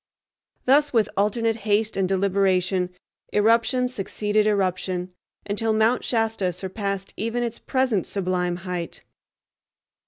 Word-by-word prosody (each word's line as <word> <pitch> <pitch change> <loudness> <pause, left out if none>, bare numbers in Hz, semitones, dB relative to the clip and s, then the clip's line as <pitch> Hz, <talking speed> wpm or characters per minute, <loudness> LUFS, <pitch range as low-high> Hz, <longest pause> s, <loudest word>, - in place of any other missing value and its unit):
Thus 290 +3 +4
with 225 -4 +2
alternate 225 +3 +1
haste 215 0 0
and 190 -1 0
deliberation 190 -1 +1 0.4
eruption 230 +4 +3
succeeded 210 -2 0
eruption, 185 -2 -1 0.3
until 220 +2 0
Mount 220 +3 +2
Shasta 225 -5 0
surpassed 195 +1 -4
even 230 +3 -1
its 235 -1 -4
present 255 -8 0
sublime 180 -2 -1
height. 180 -2 -5
205 Hz, 105 wpm, -24 LUFS, 185-225 Hz, 0.4 s, Thus